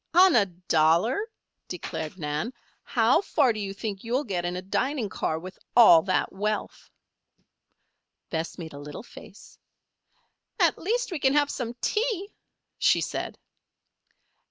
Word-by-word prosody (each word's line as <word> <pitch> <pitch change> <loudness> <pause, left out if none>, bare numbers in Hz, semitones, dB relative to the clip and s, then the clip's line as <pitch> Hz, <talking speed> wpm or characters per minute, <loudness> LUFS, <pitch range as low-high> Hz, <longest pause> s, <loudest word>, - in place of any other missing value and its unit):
"On 365 -1 +7
a 210 -4 +4
dollar?" 175 - +1 0.4
declared 160 -1 -5
Nan. 150 +7 -3 0.3
"How 240 +7 +3
far 280 -10 +2
do 215 - -6
you 200 -1 -3
think 200 -1 -5
you'll 245 +5 0
get 185 -8 -3
in 175 0 -2
a 180 - -4
dining 245 +4 -1
car 160 - -2
with 185 +3 -9 0.2
all 175 -9 +9
that 185 +2 0
wealth?" 210 +2 -3 1.4
Bess 160 0 -3
made 160 -4 -8
a 140 - -8
little 150 +7 -8
face. - - -14 1.0
"At - - +3
least, 475 +5 -1
we 340 - -3
can 265 0 +3
have 290 0 +3
some 240 -2 -4
tea," 425 -3 -1 0.5
she - - +4
said. - - -4
210 Hz, 140 wpm, -26 LUFS, 175-280 Hz, 1.4 s, all